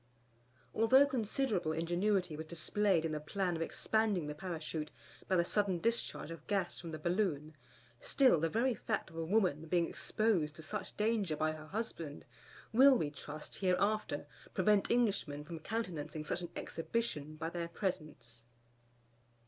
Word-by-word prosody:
Although 260 +5 +6
considerable 230 - 0
ingenuity 175 +1 +1
was 160 +1 -6
displayed 170 +2 +1
in 160 - -1
the 155 - -2
plan 180 +3 -1
of 165 - -3
expanding 210 0 +1
the 150 - -3
Parachute 155 -2 -4 0.4
by 190 - +2
the 170 -1 +3
sudden 200 -1 +1
discharge 230 -3 -1
of 165 -2 -9
gas 195 -4 0
from 170 - -7
the 160 - -4
balloon; 155 -3 -1 0.4
still 275 - +4
the 165 +1 +1
very 240 +7 +2
fact 220 -6 -3
of - - -14
a 165 - -2
woman 170 -4 +1
being 170 0 +2
exposed 185 -9 0
to 160 - -10
such 205 +5 -5
danger 210 -6 +1
by 155 +1 +1
her 155 0 -8
husband, 170 -7 -5 0.5
will, 265 +3 +8
we 150 -7 -1
trust, 150 +1 -8
hereafter 195 -4 +1 0.3
prevent 200 +1 +3
Englishmen 200 -11 +1
from 165 +1 -7
countenancing 160 -6 -4
such 175 - -2
an 175 - -5
exhibition 160 -6 -3
by 160 +1 -4
their 170 -1 -3
presence. 155 - -4
175 Hz, 155 wpm, -35 LUFS, 155-215 Hz, 0.5 s, will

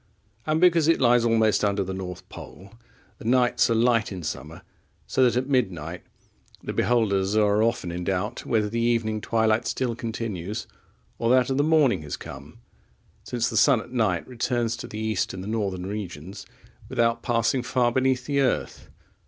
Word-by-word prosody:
And, 155 +1 +1
because 170 -3 +4
it 165 - +3
lies 120 -1 +4
almost 110 -2 +2
under 100 -1 +1
the 95 0 -5
North 95 -1 -7
Pole, 100 +3 -12 0.5
the - - -11
nights 125 +1 +3
are 115 - +2
light 115 -2 +2
in 90 -3 -6
summer, 75 - -6 0.4
so 130 - +1
that 120 -2 +3
at 130 +1 -1
midnight 90 - -1 0.6
the - - -4
beholders 105 -4 +1
are 105 0 +3
often 115 -6 0
in 90 +1 -4
doubt 95 +5 -2
whether 110 -2 +1
the 115 +3 -3
evening 115 -2 0
twilight 110 0 +1
still 125 -3 -1
continues, 110 -3 -4 0.5
or 115 - 0
that 130 +1 +3
of 135 - 0
the 145 - +3
morning 150 - +3
has 75 -2 -6
come; 70 +12 -11 0.6
since 120 -1 -1
the 115 - -4
sun 130 +3 +5
at 120 - -10
night 110 -9 0
returns 120 -1 -1
to - - -7
the 105 - -8
east 110 -2 -1
in 95 - -6
the 95 - -7
northern 100 -5 -2
regions 95 -3 -7 0.4
without 115 0 +1
passing 120 +1 +1
far 125 -1 +1
beneath 130 0 +1
the 140 0 0
earth. 130 - -1
115 Hz, 175 wpm, -25 LUFS, 100-125 Hz, 0.6 s, sun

